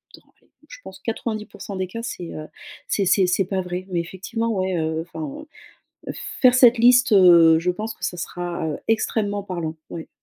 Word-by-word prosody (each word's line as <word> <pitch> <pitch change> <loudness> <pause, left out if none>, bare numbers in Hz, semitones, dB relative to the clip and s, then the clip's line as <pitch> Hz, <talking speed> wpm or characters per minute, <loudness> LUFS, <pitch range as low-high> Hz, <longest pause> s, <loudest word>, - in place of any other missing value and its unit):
dans - - -19 0.2
allez, - - -33 0.2
je - - -11
pense 190 - -11
90% 215 -2 -5
des 185 - -1
cas 230 +6 -7
c'est, 180 -7 -6
heu, 155 0 -7 0.4
c'est 200 - 0
c'est 190 0 +3
c'est 185 +2 +1
pas 190 0 -2
vrai, 180 0 -5
mais 175 -2 -1
effectivement 210 +7 -4
ouais, 190 -3 -1
heu, 160 0 -1
enfin, 160 - -7 0.6
heu, - - -3 0.3
faire 255 -2 +7
cette 245 -1 +6
liste, 250 +2 +5
heu, 170 -5 +7
je 175 +2 -1
pense 215 +5 -5
que - - -6
ça - - -3
sera, 175 -1 -4
heu, 150 - -3
extrêmement 210 -2 0
parlant, 170 -5 -4 0.2
ouais. 165 - -7
185 Hz, 195 wpm, -22 LUFS, 170-220 Hz, 0.6 s, faire